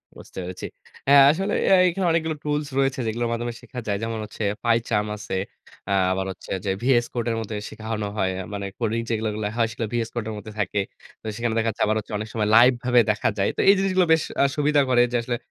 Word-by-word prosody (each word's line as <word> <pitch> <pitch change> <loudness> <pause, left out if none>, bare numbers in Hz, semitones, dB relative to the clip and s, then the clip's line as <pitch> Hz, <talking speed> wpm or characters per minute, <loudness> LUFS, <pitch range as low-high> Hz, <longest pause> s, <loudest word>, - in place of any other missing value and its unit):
বুঝতে - - -14
পেরেছি। 90 0 -6 0.4
অ্যা 140 - +7 0.2
আসলে 195 +5 -2
এ - - +4 0.2
এখানে 185 +1 -2
অনেকগুলো 160 -1 0
টুলস 150 0 -1
রয়েছে 135 -1 +1
যেগুলোর 115 +2 -1
মাধ্যমে 120 0 -2
শেখা 125 - -8
যায়। 100 -1 0
যেমন 115 -1 -3
হচ্ছে 105 +1 -7 0.2
Pi 115 -1 +4
Charm 105 -1 0
আছে, 100 - -5 0.6
আ - - +3 0.2
আবার 95 0 -1
হচ্ছে 90 - -11
যে 95 - +1
VS 120 -2 +3
Code 120 -1 -2
এর - - -1
মধ্যে 110 -1 -5
শেখানো 110 -1 -4
হয়। 95 -2 +1
আ - - -5
মানে 100 -1 -4
কোডিং 115 -1 0
যেগুলো 110 -1 -1
গুলা 105 -1 -2
হয় 115 - +3
সেগুলো 115 -1 -3
VS 115 -1 -1
Code 120 -3 -3
এর 110 - -4
মধ্যে 105 +1 -9
থাকে। 100 +1 0 0.4
তো - - -21
সেখানে 115 0 -1
দেখা 115 - +1
যাচ্ছে 105 - -1
আবার 110 - +1
হচ্ছে 110 - -10
অনেক 110 +1 -5
সময় 105 -2 0
লাইভ 120 +3 +8
ভাবে 125 -1 +4
দেখা 105 - 0
যায়। 100 - +2
তো - - +2
এই - - +9
জিনিসগুলো 185 -2 +2
বেশ 160 - +2 0.2
আ - - +5
সুবিধা 150 -1 +3
করে 125 -1 +5
যে 125 - +1
আসলে 120 0 -2
115 Hz, 235 wpm, -24 LUFS, 105-130 Hz, 0.6 s, এই